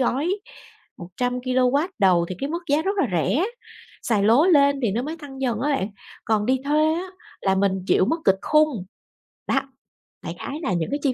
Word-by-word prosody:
gói 270 +7 +1 0.7
100kW 250 - 0
đầu 180 -4 +4
thì 185 - -4
cái 275 - -3
mức 340 +2 -3
giá 295 +2 +3
rất 395 +4 -1
là 295 - +3
rẻ, 210 - +1 0.6
xài 215 -4 +1
lố 235 - +5
lên 280 -5 +4
thì 225 - +2
nó 235 +4 -1
mới 310 +4 -5
tăng 270 -3 -10
dần 240 -5 -1
á 290 +4 0
các 280 - +2
bạn, 190 - -2 0.4
còn 215 -1 +1
đi 260 +1 +2
thuê 305 +2 +2
á 355 +3 -3 0.3
là 190 -1 +1
mình 195 0 +2
chịu - - +4
mức 330 - 0
kịch 195 0 +4
khung, 305 -10 +2 0.6
đó. - - +2 0.6
Đại - - -5
khái 295 +3 -5
là 195 - 0
những 170 -2 -1
cái 285 - -1
chi 270 - +2
260 Hz, 205 wpm, -23 LUFS, 210-300 Hz, 0.7 s, lố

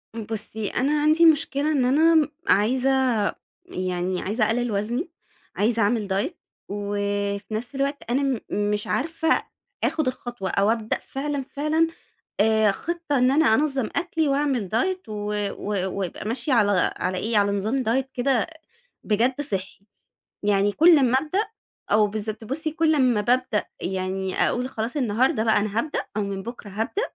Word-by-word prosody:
إمم 225 - -4
بُصّي 220 0 -4
أنا 295 +4 +1
عَندي 310 +3 +5
مشكلة 300 -1 +3
إن 270 -4 +2
أنا 315 +6 +4
م 310 -1 +4 0.2
عايزة 250 +7 +3 0.8
يعني 185 - -2
عايزة 215 +3 0
أقلل 240 +1 0
وزني، 235 - -2 0.5
عايزة 225 +2 +1
أعمل 210 0 +1
diet 205 - -1 0.4
وفي 205 0 -2
نَفْس 240 +5 -4
الوقت 275 +1 -1
أنا 265 +4 +1
م 270 -4 0 0.3
مش 210 0 -2
عارفة 320 +3 +1 0.4
أخد 310 -3 +1
الخطوة 240 -6 -4
أو 200 +1 +2
أبدأ 225 -1 -1
فعلًا 280 0 -3
فعلًا 305 +3 +1 0.5
آآ 220 -1 +4
خطة 335 - -2
إن 250 +1 +4
أنا 290 -4 +4
أنظّم 270 -3 +1
أكلي، 330 -3 0
وأعمل 275 -7 0
diet 370 +8 0
و 210 -1 -4 0.2
و 195 -2 -2
ويبقى 190 -2 -4
ماشية 240 +4 -1
على 205 -6 +3
على 185 +1 -2
إيه 225 +3 -1
على 200 0 +2
نظام 220 +7 -1
diet 250 +4 +1
كده 250 -1 +1 0.6
بجد 240 +6 +1
صِحّي. 195 -7 -4 0.6
يعني 205 0 +2
كل 330 +8 +6
أمّا 260 -2 +3
أبدأ 315 +7 -2 0.5
آه 210 0 +5
بالضبط 215 +1 -5
بُصّي 310 +7 -3
كل 320 0 +2
أمّا 250 -6 +3
بابدأ 240 -2 +1 0.2
يعني 190 0 -2
أقول 250 +1 0
خلاص 230 +3 -4
النهاردة 250 +1 +1
بقى 220 -1 +3
أنا 210 +1 -1
هابدأ 295 +4 -2 0.2
أو - - +1
من 200 -1 -4
بكرة 235 -2 -8
هابدأ 220 - -2
235 Hz, 155 wpm, -24 LUFS, 205-280 Hz, 0.8 s, كل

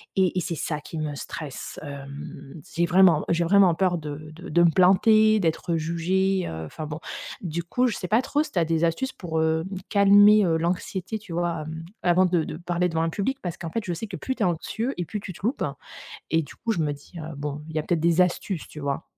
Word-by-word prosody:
et 190 -2 +2
et - - +2
c'est 170 - -3
ça 150 0 -3
qui 160 - -8
me 150 -1 -2
stresse. 140 0 -7
Hem, 140 +1 -8 0.2
j'ai 170 0 +3
vraiment 180 -3 +5
j'ai 170 0 +2
vraiment 185 0 +5
peur 180 0 +1
de 155 0 -7
de 175 +4 -10
de 175 0 +4
me 170 - +5
planter, 215 +5 +5
d'être 165 0 0
jugée, 180 +4 0
heu, 80 0 -5
enfin, 155 - -7
bon. 150 +1 -6 0.4
Du 170 -2 -3
coup, 250 +9 +1
je 220 - -2
sais 180 - -4
pas 220 +6 +3
trop 290 +3 0
si - - -11
tu - - -5
as - - +3
des 165 +1 +1
astuces 170 +11 -1
pour, 160 -3 -3
heu, 160 +1 +1 0.2
calmer, 205 +1 +7
heu, 165 -1 +2
l'anxiété, 180 +4 -2
tu 195 -5 -10
vois, 170 -2 -1
hem, 160 +1 -6 0.2
avant 175 0 +4
de 180 - -1
de - - -6
parler 175 +1 0
devant 160 -1 -1
un 165 - +1
public 260 +10 -2
parce 175 -2 -4
qu'en 170 -3 -5
fait, 230 - -2
je 175 - -2
sais 195 +7 -5
que - - -6
plus 260 - -3
tu 225 - -1
es - - +4
anxieux 220 - -2
et 175 - -1
plus 210 +7 -4
tu 190 - -7
te 190 - -8
loupes 250 - 0 0.7
et 165 0 +3
du 145 - -12
coup, 230 - -2
je - - -3
me 150 -2 +1
dis, 145 +5 -16
heu: 160 0 -7
«Bon, 145 +1 -4
il 160 - -9
y - - +2
a - - -2
peut-être 170 +1 0
des 170 +1 +3
astuces», 180 -1 -1
tu 150 - -10
vois? 140 -1 -2
170 Hz, 250 wpm, -25 LUFS, 160-190 Hz, 0.7 s, calmer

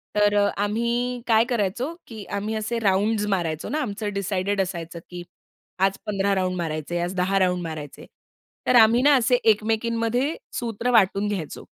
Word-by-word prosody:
तर 205 0 +3
अ, 205 0 +4 0.2
आम्ही 235 +3 -1
काय 225 0 +5
करायचो 240 - -1
की 220 -3 -8 0.2
आम्ही 215 +2 -3
असे 220 +2 -2
राउंड्स 210 +1 +1
मारायचो 160 -3 -3
ना 305 - -1
आमचं 205 -3 -4
डिसायडेड 200 0 -1
असायचं 170 -2 -5
की 175 -1 -7 0.6
आज 195 0 +2
15 200 -1 0
राउंड 185 -1 0
मारायचे, 165 0 -3
आज 175 +2 -2
10 190 +2 +1
राउंड 180 -1 +1
मारायचे 155 -3 -7 0.6
तर 250 - +4
आम्ही 230 +1 +6
ना 290 +1 +5
असे 250 +1 +3
एकमेकींमध्ये 230 +5 +1 0.2
सूत्र 235 +1 -2
वाटून 200 -2 +3
घ्यायचो. 185 -7 -5
205 Hz, 160 wpm, -24 LUFS, 185-230 Hz, 0.6 s, आम्ही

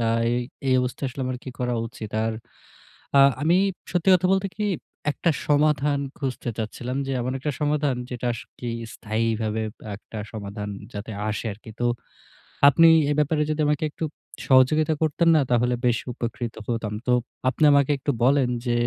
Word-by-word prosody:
আ - - +1 0.3
এই 120 - +1 0.3
এই 130 - +4
অবস্থায় 125 +2 -2
আসলে 130 - -8
আমার 130 -1 -3
কি - - -6
করা 125 -1 0
উচিত? 110 -2 -8
আর 115 - 0 0.9
আ - - +8 0.2
আমি 165 +4 +3 0.4
সত্যি 180 +1 +2
কথা 180 0 +1
বলতে 195 0 +1
কি 210 - -1 0.5
একটা 170 - 0 0.2
সমাধান 145 -1 +3 0.2
খুঁজতে 130 -3 -3
চাচ্ছিলাম 120 +3 -4
যে - - -2
এমন 125 +2 -2
একটা 150 +3 -2
সমাধান 145 -2 +1 0.2
যেটা 125 0 -3
সত্যিই 120 -1 -6 0.2
স্থায়ীভাবে 110 0 -1
ব - - -81 0.2
একটা 110 +2 -11 0.2
সমাধান 105 -1 -5 0.2
যাতে 105 +2 -6 0.2
আসে 110 - -3
আরকি। 110 +2 -14
তো 120 - -1 0.9
আপনি 165 +4 +6 0.2
এ - - +3
ব্যাপারে 150 +1 +2
যদি 155 0 0
আমাকে 150 +1 +1
একটু 160 - -6 0.4
সহযোগিতা 150 +4 +5
করতেন 160 +2 +2
না 155 - +5
তাহলে 125 +1 +3
বেশি 120 -1 +1
উপকৃত 120 -1 -4
হতাম। 115 -3 -2
তো - - +3 0.4
আপনি 130 +4 -1
আমাকে 140 0 +4
একটু 140 +2 -1
বলেন, 135 0 +4 0.2
যে 120 - +1
130 Hz, 170 wpm, -24 LUFS, 115-150 Hz, 0.9 s, আ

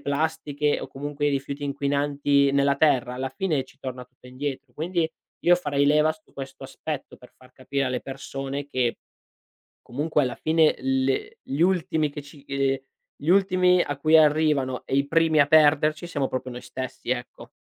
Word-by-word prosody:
plastiche, 150 0 -1
o - - -5
comunque 145 +1 -4
i - - +3
rifiuti 140 +1 -3
inquinanti 140 0 +1
nella 140 0 +3
terra, 135 -5 +2
alla 130 +1 -3
fine 145 0 -1
ci - - -21
torna 130 -1 -6
tutto 125 0 -20
indietro. 130 0 -5
Quindi 165 +4 -1 0.4
io 175 - +6
farei 145 -5 0
leva 150 +2 +4
su 155 0 -23
questo 135 0 -8
aspetto 140 +1 -6
per 125 - -17
far 130 - -20
capire 135 +1 -2
alle 130 -1 -2
persone 135 +1 -6
che 125 -4 -1 0.9
comunque 150 +4 0
alla 130 -3 -1
fine, 160 0 +3
le 130 0 -1
gli 135 +2 -5
ultimi 165 -4 +2
che 145 - -7
ci 140 0 -16
ehm, 135 -1 0 0.4
gli 150 - -4
ultimi 185 -1 +4
a 145 - -4
cui 155 +3 +3
arrivano 150 -4 +2
e - - -2
i 140 +1 +2
primi 160 0 +3
a 145 - +5
perderci 155 +1 +4
siamo 145 -5 -1
proprio 130 0 -4
noi 125 0 -7
stessi, 130 -1 -7
ecco. 125 -1 -5
140 Hz, 175 wpm, -25 LUFS, 135-155 Hz, 0.9 s, io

